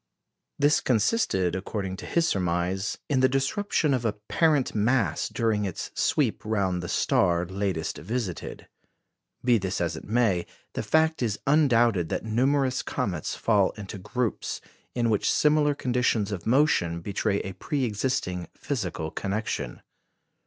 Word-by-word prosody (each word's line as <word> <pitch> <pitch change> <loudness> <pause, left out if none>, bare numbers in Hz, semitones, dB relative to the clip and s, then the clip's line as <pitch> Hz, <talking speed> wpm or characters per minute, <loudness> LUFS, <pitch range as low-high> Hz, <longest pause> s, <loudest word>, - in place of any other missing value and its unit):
This 145 +1 +4
consisted, 105 - +1
according 95 0 -3
to - - -8
his 170 -1 +2
surmise, 90 - -1
in 140 -3 +1
the 130 0 +4
disruption 140 +3 +1
of 125 -2 0
a 110 -3 +1
parent 140 +7 +1
mass 110 - +1
during 110 -2 0
its 95 -4 -4
sweep - - +1
round 100 -5 0
the 85 - -6
star 85 0 +2
latest 95 -3 -2
visited. 110 -6 -4 0.8
Be 120 -3 +4
this 95 -1 -2
as 85 -1 -1
it - - -8
may, 105 -6 +1 0.3
the - - -2
fact 160 -1 +2
is 110 -4 0
undoubted 120 - +3
that - - -2
numerous 130 +4 +1
comets 85 -6 -3
fall 105 -4 +2
into 100 -1 -7
groups, 115 +4 -2 0.4
in 120 -2 +1
which 105 - +2
similar 150 -1 +3
conditions 120 -5 0
of 95 -2 -5
motion 115 - +2
betray 100 +1 -1
a 95 - -6
pre 135 +8 -2
existent 105 - -2
physical 80 0 -3
connection. 100 +4 -3
110 Hz, 140 wpm, -26 LUFS, 95-130 Hz, 0.8 s, This